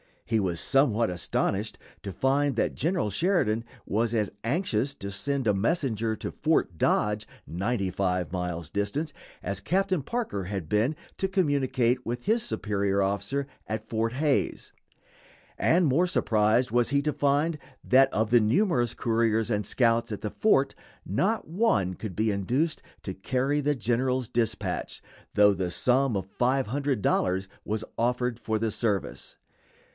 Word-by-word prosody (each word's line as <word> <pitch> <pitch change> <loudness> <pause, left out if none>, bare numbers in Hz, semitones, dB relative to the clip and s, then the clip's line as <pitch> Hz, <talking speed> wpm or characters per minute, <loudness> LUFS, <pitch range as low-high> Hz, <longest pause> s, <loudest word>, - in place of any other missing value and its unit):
He 115 -1 +1
was 90 -5 -1
somewhat 120 -5 +3
astonished 95 +4 -1 0.3
to 100 - -5
find 135 +5 +1
that 115 - 0
General 165 - 0
Sheridan 115 - +1 0.2
was 115 +2 0
as 105 -3 0
anxious 140 - 0
to 100 0 -6
send 135 +7 -1
a 105 - +3
messenger 115 - 0
to - - -5
Fort 155 - 0
Dodge, 105 +5 +1 0.2
ninety 95 +2 -1
five 90 -2 -1
miles 90 -3 -3
distant, 105 +11 -2 0.3
as 100 -1 -3
Captain 185 - 0
Parker 180 - -3
had 95 -5 -4
been 115 +9 +2 0.2
to 190 - 0
communicate 135 -9 +1
with 120 +1 -4
his 225 +4 +2
superior 100 -2 0
officer 100 +8 -1 0.2
at 110 0 -4
Fort 115 +1 0
Hays; 145 +1 0 0.9
and 175 +2 +3
more 155 +6 +3
surprised 110 - +2
was 120 0 +2
he 140 +1 +2
to 150 0 0
find 145 +3 +1 0.2
that 135 +1 +5
of 110 0 0
the 120 - +7
numerous 120 - +2
couriers 115 -1 +1
and 105 -1 0
scouts 115 -2 +2
at 105 - -6
the 105 - -3
fort 140 -11 +2 0.3
not 195 - 0
one 155 - +1
could 95 -1 -7
be 110 +3 +1
induced 125 - 0 0.2
to 95 - -4
carry 130 +9 0
the 145 +1 +1
general's 125 +1 0
dispatch, 115 -1 -2 0.3
though 105 -1 +6
the 95 -2 -2
sum 125 +5 +2
of 95 -2 -2
$500 125 -7 +1 0.2
was 110 +1 -2 0.2
offered 125 0 0
for 110 -1 -1
the 110 0 -1
service. 105 -2 -2
115 Hz, 150 wpm, -27 LUFS, 105-140 Hz, 0.9 s, the